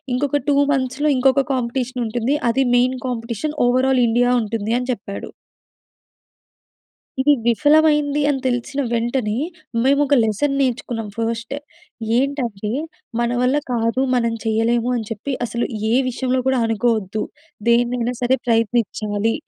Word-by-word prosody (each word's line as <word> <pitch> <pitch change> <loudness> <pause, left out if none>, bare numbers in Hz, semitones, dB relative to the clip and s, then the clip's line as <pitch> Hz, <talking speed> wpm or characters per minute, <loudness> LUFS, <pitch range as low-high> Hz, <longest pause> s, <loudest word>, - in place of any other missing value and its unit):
ఇంకొక 285 +2 0
2 285 - +3 0.2
మంత్స్‌లో 265 +3 0
ఇంకొక 270 +1 +3
కాంపిటీషన్ 250 0 -2
ఉంటుంది. 240 +5 0 0.2
అది 270 +3 +2
మెయిన్ 255 +1 +2
కాంపిటీషన్. 240 +4 -3
ఓవరాల్ 255 +1 +3
ఇండియా 245 +2 +2
ఉంటుంది 220 +1 -2
అని 250 +1 -5
చెప్పాడు. 200 -2 -7 1.9
ఇది 290 +3 +5
విఫలమైంది 295 +3 +3
అని 285 -2 +1
తెలిసిన 255 +3 -1
వెంటనే 235 -2 0 0.5
మేము 280 +2 +3
ఒక 285 0 +2
లెసన్ 225 +6 0
నేర్చుకున్నాం 240 -4 -1
ఫస్ట్. 230 +2 -3 0.6
ఏంటంటే 245 -7 -2 0.5
మన 235 0 +1
వల్ల 255 +3 +2 0.2
కాదు 230 +1 0
మనం 235 -2 +1
చేయలేము 225 +2 +1
అని 230 - -3
చెప్పి 225 +6 -4
అసలు 235 +1 -2 0.2
ఏ - - +2 0.2
విషయంలో 255 +1 -1
కూడా 265 -1 +2
అనుకోవద్దు. 220 -2 0 0.5
దేన్నైనా 240 +1 +2
సరే 255 +2 +2
ప్రయత్నించాలి. 225 -2 0
245 Hz, 125 wpm, -20 LUFS, 230-265 Hz, 1.9 s, ఇది